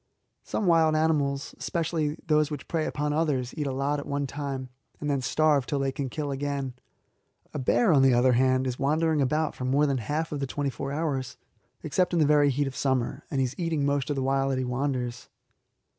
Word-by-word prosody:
Some 215 - -3
wild 165 -3 +4
animals, 145 -3 0
especially 160 -2 -1
those 150 -1 +3
which 150 -3 -6
prey 160 -2 -1
upon 150 0 -1
others, 145 -6 0
eat 150 -3 -2
a - - -1
lot 140 +2 -1
at 145 - -7
one 140 0 -1
time, 135 -2 -5 0.3
and 145 -1 -1
then 140 -2 0
starve 140 +1 +2
till 145 - -1
they 135 -1 0
can 135 -1 -4
kill 145 +2 -3
again. 140 -1 -3 0.8
A 150 - -3
bear, 180 - +3
on 140 - +5
the 135 0 +5
other 125 +1 +4
hand, 130 +1 +3
is 125 -1 -3
wandering 155 +2 +2
about 150 +3 +1
for - - -7
more 140 +3 +3
than 135 -3 0
half 150 +8 -2
of 145 - -3
the 135 - -2
twenty 140 +1 -2
four 140 +1 -5
hours, 140 -4 -2 0.5
except 180 +4 0
in 170 - +2
the 155 - +5
very 145 -1 +4
heat 140 +2 0
of 135 -1 -5
summer, 135 +1 -1
and 135 - 0
he - - +3
is 125 - -5
eating 165 -4 0
most 140 -1 0
of 145 - 0
the 135 - -1
while 135 0 +1
that 135 - 0
he 130 - -1
wanders. 125 -2 -2
140 Hz, 220 wpm, -27 LUFS, 130-150 Hz, 0.8 s, on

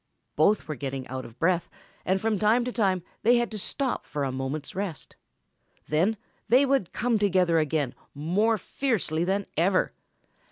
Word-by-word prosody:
Both 200 -9 +3
were 155 - -2
getting 135 -1 -5
out 130 0 -5
of 115 - -13
breath, 175 +2 +1 0.4
and 190 +1 +2
from 215 -1 0
time 225 +4 +3
to 250 - -2
time 190 -7 +1 0.2
they 240 +3 +5
had 240 -1 0
to 215 - -4
stop 265 +6 -2
for 145 -2 -3
a 135 - -1
moment's 135 +3 -4
rest. 190 -6 -5 0.7
Then 180 +9 +2 0.3
they 255 +4 +6
would 270 -10 +1
come 235 -1 +1
together 180 -5 +3
again 150 -4 0 0.2
more 195 +10 +1
fiercely 200 - -1
than 195 +3 0
ever. 185 +3 +2
185 Hz, 165 wpm, -27 LUFS, 155-220 Hz, 0.7 s, they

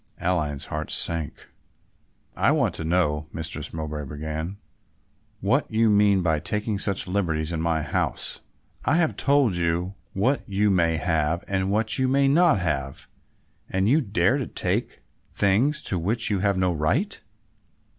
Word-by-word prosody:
Aline's 75 -6 -1
heart 75 0 -5
sank. 80 -4 0 0.9
"I - - +2
want - - +1
to - - -4
know," 80 -3 0
Mistress 80 -1 -5
Mowbray 75 -2 -5
began, 80 +6 -5 0.8
"what - - +1
you 110 0 +3
mean 100 -2 +4
by 80 -3 +1
taking 105 +4 -2
such 100 -1 +1
liberties 85 -5 -1
in 80 -2 -2
my 80 -1 0
house? 75 - -2 0.4
I 155 - +2
have 165 -3 +1
told 140 -8 +2
you 85 +2 -1 0.2
what 125 +9 +1
you 100 +1 +2
may 85 -3 +2
have 80 +1 0
and 95 -1 -1
what 110 +4 0
you 130 - +2
may 135 +1 +3
not 160 - +4
have, 70 -6 -3 0.6
and 95 +1 0
you 145 +7 +4
dare 105 +3 +1
to 130 - -3
take - - -2 0.3
things 110 +10 +2
to 90 - -1
which 110 +6 0
you 100 - +1
have 100 0 +1
no 90 -1 +1
right." 120 - 0
95 Hz, 155 wpm, -25 LUFS, 80-105 Hz, 0.9 s, mean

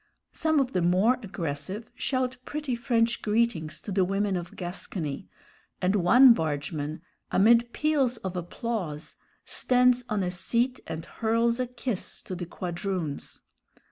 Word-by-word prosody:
Some 315 -2 +2
of 265 -2 0
the 180 - +1
more 190 +9 +3
aggressive 185 +2 -5
shout 255 0 -1
pretty 290 -1 -3
French 235 -1 +1
greetings 210 -8 0
to 205 - -7
the 190 0 +3
women 195 +1 0
of 175 -1 -5
Gascony, 175 -5 -5 0.5
and 185 +3 +2
one 240 +7 +7
bargeman, 155 -2 -3 0.3
amid 235 +4 +4
peals 280 -5 +1
of 190 -4 -5
applause, 175 -3 -4 0.3
stands 250 0 +3
on 210 -3 0
a 180 - -1
seat 235 +8 0
and 160 0 -5
hurls 230 +2 +1
a 255 - 0
kiss 245 -4 -3
to - - -6
the 175 -1 -5
quadroons. 175 -4 -4
205 Hz, 140 wpm, -27 LUFS, 175-240 Hz, 0.5 s, one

